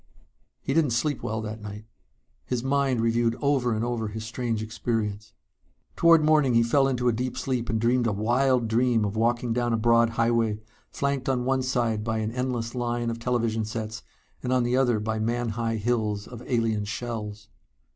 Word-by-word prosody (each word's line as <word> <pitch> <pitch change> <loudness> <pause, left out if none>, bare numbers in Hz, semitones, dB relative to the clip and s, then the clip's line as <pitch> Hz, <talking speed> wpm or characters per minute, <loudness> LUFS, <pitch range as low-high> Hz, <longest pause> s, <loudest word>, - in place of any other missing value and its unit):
He 135 - -2
didn't 150 -6 +2
sleep 140 +3 0
well 110 +1 -3
that 110 0 -6
night. 105 +1 -8 0.6
His 125 -2 -2
mind 135 -3 +1
reviewed 115 0 +2
over 135 -3 +1
and 110 +2 -1
over 120 -2 -2
his 110 +1 -6
strange 115 -1 -2
experience. 110 -2 -3 0.6
Toward 165 -2 +5
morning 150 -5 +4
he 115 - +5
fell 135 +4 +3
into 125 -2 0
a 120 - +3
deep 125 +3 -3
sleep 125 -3 -2
and 110 - 0
dreamed 120 +1 +2
a - - +1
wild 120 +4 +2
dream 115 -1 +2
of 100 +1 -3
walking 120 +1 +1
down 120 0 0
a - - +2
broad 115 +1 +4
highway, 115 -2 +1 0.3
flanked 140 -2 -2
on 125 -2 0
one 130 0 +1
side 120 -4 0
by 110 0 -1
an 110 0 -2
endless 120 -2 -2
line 120 -1 -1
of 115 - -5
television 115 -2 0
sets 110 0 -5 0.4
and 125 - -2
on 130 -1 +3
the 120 +1 +1
other 125 -4 +2
by 110 +1 -2
man 120 +2 -1
high 115 +1 -2
hills 110 -2 -1
of 120 -2 -9
alien 115 -3 +1
shells. 105 -1 -5
115 Hz, 185 wpm, -26 LUFS, 110-125 Hz, 0.6 s, Toward